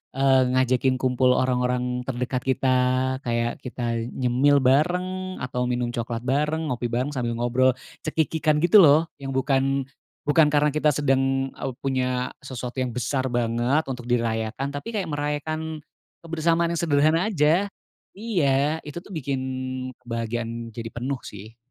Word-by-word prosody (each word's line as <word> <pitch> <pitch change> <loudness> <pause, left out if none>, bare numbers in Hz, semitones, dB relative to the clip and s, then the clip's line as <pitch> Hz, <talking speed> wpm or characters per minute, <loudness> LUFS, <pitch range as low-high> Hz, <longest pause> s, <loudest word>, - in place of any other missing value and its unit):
eee, 135 -2 +4
ngajakin 130 0 +2
kumpul 130 0 +2
orang-orang 125 -1 0
terdekat 125 0 -2
kita. 130 0 +2 0.5
Kayak 120 0 -1
kita 120 -2 -3 0.2
nyemil 130 +3 +3
bareng, 180 +7 +1
atau 125 0 -2
minum 120 -1 -1
coklat 115 0 -3
bareng, 150 +5 0
ngopi 120 0 -2
bareng 125 +4 -1
sambil 120 -2 -1
ngobrol 125 +2 +3 0.3
cekikikan, 155 -1 +1
gitu 175 +5 +7
loh, 155 +2 +5
yang 135 -1 -5
bukan 135 0 +1 0.4
bukan 150 +1 +5
karena 150 0 +2
kita 155 0 +3
sedang 135 -2 +1
au - - -4
punya 130 -2 -1
sesuatu 130 -1 -6
yang 125 - -3
besar 130 +2 -1
banget, 120 +5 +1
untuk 125 -2 -5
dirayakan. 115 +1 -1
Tapi 185 +11 -5
kayak 195 -4 -1
merayakan 155 +2 -3 0.4
kebersamaan 165 +1 +1
yang 170 - -2
sederhana 155 +3 +3
aja. 170 +1 +3 0.5
Iya, 155 -8 +1
itu 150 - -7
tuh - - -14
bikin 140 -4 -2 0.6
kebahagiaan 115 -1 -4
jadi 115 +1 -6
penuh, 125 +3 -4
sih. 105 +3 -10
135 Hz, 140 wpm, -24 LUFS, 125-150 Hz, 0.6 s, gitu